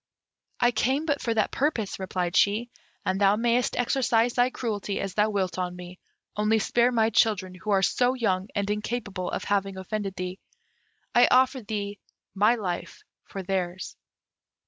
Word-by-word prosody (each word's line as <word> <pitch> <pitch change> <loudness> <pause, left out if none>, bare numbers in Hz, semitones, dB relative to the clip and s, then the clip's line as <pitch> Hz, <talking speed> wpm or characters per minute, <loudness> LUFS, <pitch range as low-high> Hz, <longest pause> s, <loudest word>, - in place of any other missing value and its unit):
"I 240 0 +4
came 260 +6 0
but 290 -3 0
for 235 - -1
that 215 - +1
purpose," 245 -10 -1
replied 180 -1 -2
she, 220 +4 +2 0.3
"and 190 +2 0
thou 200 +1 +5
mayst 240 +2 +1
exercise 240 -1 +2
thy 245 0 +3
cruelty 210 -5 -3
as 195 -2 -3
thou 210 +2 +2
wilt 190 -3 -1
on 180 -1 -2
me, 180 0 -10 0.4
only 210 +1 +2
spare 240 +3 +2
my 225 -2 +2
children, 200 -4 +2
who 185 +4 -8
are 195 -1 +3
so 250 +5 +2
young 195 -6 0
and 200 -1 0
incapable 210 -3 -3
of - - -3
having 195 -1 -1
offended 195 +1 -4
thee. 185 +1 -5 0.7
I 245 +1 +6
offer 260 +1 +4
thee 205 -1 -4 0.3
my 210 +4 +4
life 185 -6 -5 0.2
for 195 - -7
theirs." 185 -1 -3
210 Hz, 165 wpm, -26 LUFS, 190-240 Hz, 0.7 s, I